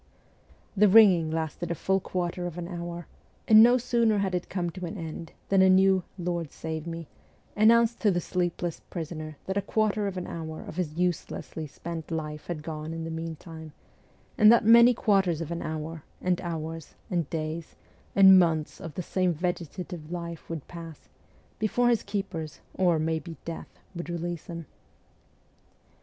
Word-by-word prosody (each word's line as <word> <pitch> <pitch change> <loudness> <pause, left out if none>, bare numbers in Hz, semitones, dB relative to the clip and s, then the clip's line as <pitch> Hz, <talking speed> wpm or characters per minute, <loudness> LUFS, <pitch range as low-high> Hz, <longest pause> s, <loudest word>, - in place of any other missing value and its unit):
The 210 +1 +5
ringing 190 -6 +6
lasted 160 +1 -3
a 170 - -1
full 190 +4 +1
quarter 180 -1 -3
of 175 -1 -7
an 170 -1 -4
hour; 175 -1 -6 0.4
and 215 0 +9
no 245 +2 +7
sooner 235 -3 +2
had 195 -2 0
it 180 -1 -2
come 175 -2 -2
to 180 0 -6
an 205 - -6
end 165 -1 -7 0.2
than 195 -1 +5
a 190 - +6
new 190 0 +5
' - - -36
Lord 170 -4 -2
save 160 0 -5
me 165 -1 -6 0.2
' - - -35
announced 230 +2 +4
to 215 - +3
the 175 -3 +2
sleepless 175 -1 -2
prisoner 155 -3 -6
that 190 +1 -2
a - - +2
quarter 210 0 0
of 195 -2 -4
an 180 - -3
hour 160 -1 -6
of - - -9
his 160 -4 -2
uselessly 175 -2 -2
spent 165 +3 -7
life 150 -2 -4
had 160 -4 -4
gone 155 0 -5
in 165 0 -5
the 165 - -5
meantime, 160 -1 -7 0.7
and 215 0 +9
that 235 -2 +5
many 235 +2 +8
quarters 195 -7 +2
of 165 -1 -5
an 170 - -3
hour, 160 +1 -5 0.2
and 180 -1 0
hours, 165 -2 -5 0.2
and 170 -5 0
days, 160 0 -4 0.4
and 190 -1 +9
months 160 -3 0
of 165 -4 -8
the 180 - -3
same 185 +1 +1
vegetative 175 -1 -4
life 170 -2 -6
would 165 -4 -5
pass, 165 -4 -10 0.5
before 240 +3 +2
his 235 -2 +3
keepers, 190 -6 -4
or, 175 -3 +2
maybe, 160 +1 -2
death, 165 -1 -6 0.2
would 175 -1 -6
release 170 0 -4
him. 170 -2 -6
175 Hz, 175 wpm, -27 LUFS, 160-190 Hz, 0.7 s, and